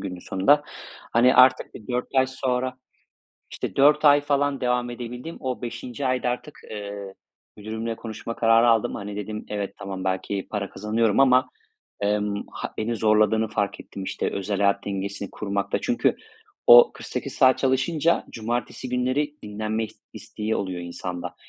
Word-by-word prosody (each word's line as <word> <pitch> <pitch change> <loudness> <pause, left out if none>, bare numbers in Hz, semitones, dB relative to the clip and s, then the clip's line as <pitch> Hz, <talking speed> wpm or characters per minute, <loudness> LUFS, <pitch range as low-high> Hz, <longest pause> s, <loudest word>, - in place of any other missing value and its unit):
günün 90 -2 -5
sonunda. 100 +12 +2 0.5
Hani 125 +3 +5
artık 130 0 +5
bir 105 - -12
4 125 +1 -1
ay 130 0 +4
sonra, 130 -1 -2 0.8
işte - - -5
4 145 +2 +5
ay 145 0 +7
falan 145 -1 0
devam 125 0 0
edebildim. 125 +6 -7
O 130 -3 -4
5'inci 120 +3 -5
ayda 130 -1 +1
artık, 125 +4 -5
eee, 100 -2 -6 0.4
müdürümle 110 +2 -4
konuşma 115 +1 -7
kararı 115 +1 +4
aldım. 115 -2 +2
Hani 100 0 -6
dedim 105 +1 -5
evet, 100 -1 -4
tamam, 95 -1 -6
belki 95 +1 -2
para 100 -2 -3
kazanıyorum 105 +2 0
ama, 130 -1 +5 0.5
emm, 105 0 0
ha - - -6
beni 115 +2 -1
zorladığını 110 0 +3
fark 100 -1 -2
ettim, 95 - -8
işte - - -2
özel 100 +1 -2
hayat 100 0 +1
dengesini 100 0 -4
kurmakta. 100 -1 -2
Çünkü 250 -1 +1 0.5
o 485 0 +9
48 - - -6
saat 130 -1 +5
çalışınca 150 +5 +1
cumartesi 120 +3 -4
günleri 130 +4 0
dinlenme 110 +1 -2
is - - -16
isteği 110 +1 -4
oluyor 95 -3 -3
insanda. 90 0 -6
115 Hz, 150 wpm, -24 LUFS, 100-130 Hz, 0.8 s, o